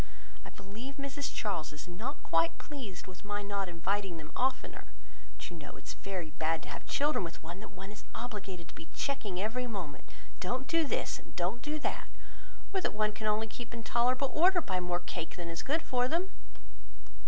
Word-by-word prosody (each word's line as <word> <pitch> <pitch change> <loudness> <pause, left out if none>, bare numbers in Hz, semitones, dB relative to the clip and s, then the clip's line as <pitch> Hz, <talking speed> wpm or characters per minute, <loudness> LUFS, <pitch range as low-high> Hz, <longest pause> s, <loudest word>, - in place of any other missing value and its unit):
I - - -7
believe 215 +8 -6
Mrs 280 -1 -1
Charles 180 -8 0
is 150 +2 -7
not 215 +11 -3
quite 165 0 +4
pleased 250 -12 -5
with 185 -1 -10
my 205 0 -1
not 200 -2 0
inviting 185 +1 +1
them 155 -1 -7
oftener; 260 +1 +1 0.5
but - - -5
you - - -5
know 155 -3 -7
it - - -11
is - - -2
very 180 -5 -3
bad 160 +1 +2
to - - -7
have - - -5
children 295 -6 +4
with 165 -2 -5
one 170 +3 -5
that 215 - -7
one 195 0 -7
is 210 - -9
obligated 200 -7 -4
to - - -9
be 160 - -8
checking 220 -10 0
every 235 +5 +1
moment; 180 - -4 0.3
"don't 255 +8 0
do 330 -2 +4
this," - - +1
and - - -15
"don't 185 +7 +1
do 295 +4 0
that;" 300 - 0 0.7
or 380 - +3
that - - +1
one 215 0 +4
can 215 0 -1
only 215 +1 +4
keep 235 +2 -6
in 230 - -4
tolerable 255 +4 +4
order 360 +3 +7
by 190 - +1
more 175 0 +2
cake 170 -1 -3
than 170 -1 -4
is 165 0 -2
good 315 +4 +2
for 250 -1 +3
them." 350 +7 +2
205 Hz, 205 wpm, -34 LUFS, 175-255 Hz, 0.7 s, order